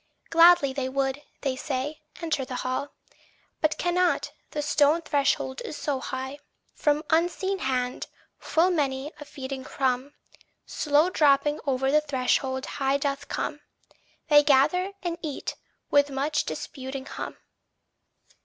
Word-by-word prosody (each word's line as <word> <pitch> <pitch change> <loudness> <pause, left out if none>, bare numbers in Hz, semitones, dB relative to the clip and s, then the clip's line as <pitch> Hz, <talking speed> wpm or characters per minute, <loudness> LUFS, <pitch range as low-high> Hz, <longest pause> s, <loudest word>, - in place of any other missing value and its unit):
Gladly 330 -5 +6
they 265 -1 -2
would, 270 +1 -1 0.2
they 270 -2 -1
say, 280 +3 -3 0.2
enter 315 -5 0
the 255 0 -6
hall, 255 +3 -2 0.7
But 310 -1 +2
cannot, 355 +1 +1 0.2
the 295 - -3
stone 295 +3 +3
threshold 275 -3 0
is 300 - -6
so 280 -3 -1
high. 265 +2 -5 0.3
From 295 0 +1
unseen 355 +4 +1
hand, 255 -3 -1 0.3
full 345 +3 +2
many 280 -3 -1
a 295 - -8
feeding 265 -1 -6
crumb, 260 +1 -1 0.5
Slow 300 +4 +2
dropping 295 -1 +3
o'er 265 0 +1
the 305 +1 +5
threshold 260 -1 0
high 275 0 0
doth 280 0 -2
come: - - -3 0.7
They 295 -1 +7
gather 300 +7 +3
and 340 -1 -3
eat, 300 -4 -4 0.4
with 285 0 +5
much 285 +3 0
disputing 265 -2 -6
hum. - - -6
285 Hz, 130 wpm, -26 LUFS, 265-305 Hz, 0.7 s, They